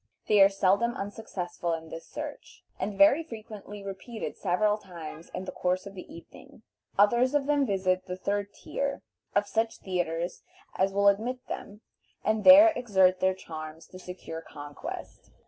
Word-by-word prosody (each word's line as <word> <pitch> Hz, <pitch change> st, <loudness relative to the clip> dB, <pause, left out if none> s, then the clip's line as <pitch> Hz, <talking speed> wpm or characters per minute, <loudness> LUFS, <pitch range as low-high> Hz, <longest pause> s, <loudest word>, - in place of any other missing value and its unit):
They 210 Hz, -2 st, +5 dB
are 195 Hz, -, +9 dB
seldom 200 Hz, +4 st, +2 dB
unsuccessful 190 Hz, -4 st, -4 dB
in 160 Hz, 0 st, -5 dB
this 165 Hz, -, -8 dB
search, 295 Hz, 0 st, -8 dB, 0.2 s
and 205 Hz, -2 st, -3 dB
very 295 Hz, +1 st, +6 dB
frequently 215 Hz, -7 st, -9 dB
repeat 200 Hz, +4 st, -7 dB
it -, -, -3 dB
several 210 Hz, +3 st, +1 dB
times 170 Hz, -4 st, -9 dB
in 185 Hz, -, -5 dB
the -, -, -5 dB
course 180 Hz, +1 st, -1 dB
of 200 Hz, -, -8 dB
the 185 Hz, -, -10 dB
evening. 170 Hz, +5 st, -14 dB, 0.3 s
Others 240 Hz, +7 st, +4 dB
of 285 Hz, -2 st, +2 dB
them 285 Hz, -2 st, +2 dB
visit 185 Hz, -2 st, 0 dB
the 180 Hz, 0 st, -4 dB
third 200 Hz, +1 st, -2 dB
tier 280 Hz, 0 st, -4 dB, 0.3 s
of 205 Hz, 0 st, +3 dB
such 225 Hz, +2 st, -1 dB
theatres 175 Hz, -2 st, -2 dB, 0.3 s
as 190 Hz, +1 st, +2 dB
will 200 Hz, +1 st, +3 dB
admit 235 Hz, +6 st, +1 dB
them, 205 Hz, +2 st, -7 dB, 0.4 s
and 215 Hz, -1 st, +1 dB
there 305 Hz, +4 st, +10 dB
exert 190 Hz, -6 st, +3 dB
their 190 Hz, 0 st, +2 dB
charms 160 Hz, -3 st, -8 dB
to 185 Hz, -, -11 dB
secure 180 Hz, -3 st, -7 dB
conquest. 145 Hz, -2 st, -9 dB
200 Hz, 165 wpm, -28 LUFS, 180-225 Hz, 0.4 s, there